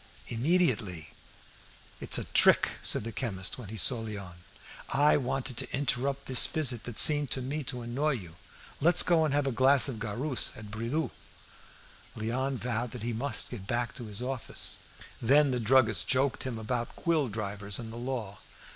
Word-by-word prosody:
"Immediately." 115 - 0 0.9
"It's - - +2
a - - -3
trick," - - +5
said - - +3
the 115 - -5
chemist, 105 -3 -3
when 110 -6 -9
he 110 - -7
saw 120 +2 +5
Léon. 100 -5 -7 0.6
"I 145 +2 +3
wanted 130 -2 -3
to - - -3
interrupt 140 0 -1
this 130 -2 +6
visit, 130 -7 -1
that 120 -3 -7
seemed 145 -2 +6
to - - -2
me 145 +4 -4
to 125 0 -4
annoy 140 +6 -1
you. 90 -9 -8 0.4
Let's 175 +3 +4
go 170 -2 +2
and 150 - -1
have 145 -1 +1
a 135 - -1
glass 130 +1 +5
of 130 -5 -5
garus 120 +6 0
at 105 -1 -10
Bridoux'." 120 +6 -3 1.1
Léon 130 +5 -2
vowed 120 -1 -3
that 120 -3 -8
he 120 0 -3
must 135 +6 -2
get 100 -6 -8
back 120 +1 -2
to 125 - -9
his 105 +2 -3
office. 130 -1 -3 0.4
Then 140 +4 +4
the 125 - -1
druggist 110 -4 +3
joked 130 0 0
him 125 -3 -4
about 120 +2 -4
quill 160 -5 0
drivers 100 -1 -3
and 115 -2 -8
the - - -8
law. 120 -6 -5
125 Hz, 175 wpm, -29 LUFS, 110-135 Hz, 1.1 s, this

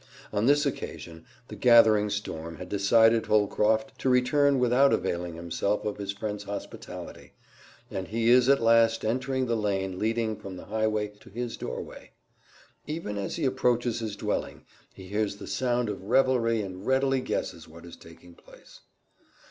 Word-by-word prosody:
On 105 +3 +1
this 145 +1 +4
occasion 85 - -6 0.2
the - - -9
gathering 110 -4 +5
storm 85 -6 -5
had 90 +3 -9
decided 115 +3 +3
Holcroft 110 +1 +1
to 130 - 0
return 140 +3 +3
without 125 +2 +4
availing 85 -1 -2
himself 85 +5 -2
of 105 - -3
his 100 -1 -4
friend's 105 +1 -5
hospitality, 100 0 -8 0.6
and 95 -1 -4
he 115 +2 +1
is 125 +1 +5
at 140 -4 +4
last 115 0 +4
entering 130 +3 -1
the 120 -1 0
lane 95 -3 -2
leading 110 0 0
from 95 -3 -9
the - - -10
highway 110 0 -1
to - - -16
his 120 +3 -5
doorway. - - -7 0.8
Even 150 -9 -4
as 100 -1 -3
he 165 - -2
approaches 125 -2 +1
his 110 -3 -4
dwelling - - -4 0.3
he 95 - -12
hears 105 +1 -1
the - - -10
sound 120 +3 -1
of 105 - -5
revelry 115 -2 +2
and 95 0 -8
readily 135 0 +2
guesses 85 -8 -4
what 85 +2 -13
is 85 - -11
taking 85 +1 -16
place. - - -18
110 Hz, 160 wpm, -27 LUFS, 100-125 Hz, 0.8 s, gathering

